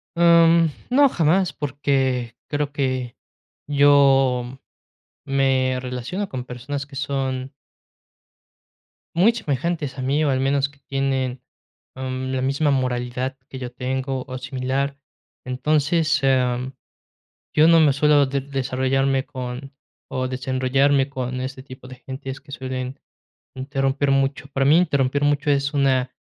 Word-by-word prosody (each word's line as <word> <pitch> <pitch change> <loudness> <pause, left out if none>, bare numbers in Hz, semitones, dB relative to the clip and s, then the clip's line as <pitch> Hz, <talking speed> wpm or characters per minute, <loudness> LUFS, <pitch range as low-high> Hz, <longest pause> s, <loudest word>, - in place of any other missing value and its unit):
Am, 170 -1 +5 0.2
no, 275 +3 +5
jamás, 175 -2 +2
porque 135 -4 -1
creo 145 -1 -2
que 130 -3 -2 0.5
yo 135 -3 +4 0.7
me 135 -2 +1
relaciono 125 +11 -4
con 130 -5 -5
personas 135 +3 -5
que 140 -1 -13
son 135 -1 -2 1.6
muy 190 +7 +5
semejantes 150 - -2
a - - -4
mí, 140 +4 +1
o 150 - +2
al 130 -1 +1
menos 135 +1 +1
que 140 0 -24
tienen, 135 -2 -1 0.5
am, 130 0 -4
la 130 - -1
misma 140 +3 +1
moralidad 130 0 -2
que 130 - -8
yo 125 -1 -6
tengo, 130 +1 -3
o 130 -1 -5
similar. 130 +2 -2 0.5
Entonces, 155 +4 +1
am, 130 -1 +1 0.8
yo 155 +1 +6
no 165 0 +6
me 150 -3 +5
suelo 145 0 +4
de 135 +1 -2
desarrollarme 135 0 0
con 130 +1 -7 0.4
o 130 0 -2
desenrollarme 130 +2 +1
con 130 -1 -4
este 130 0 -6
tipo 130 -1 -12
de 130 - -10
gentes 135 +1 -7
que 140 0 -16
suelen 130 0 -5 0.6
interrumpir 135 +1 -1
mucho. 135 +1 +1
Para 135 0 +1
mí, 150 +3 +6
interrumpir 140 -5 +1
mucho 145 +1 +1
es 140 0 +1
una 130 -2 +1
135 Hz, 130 wpm, -22 LUFS, 130-145 Hz, 1.6 s, yo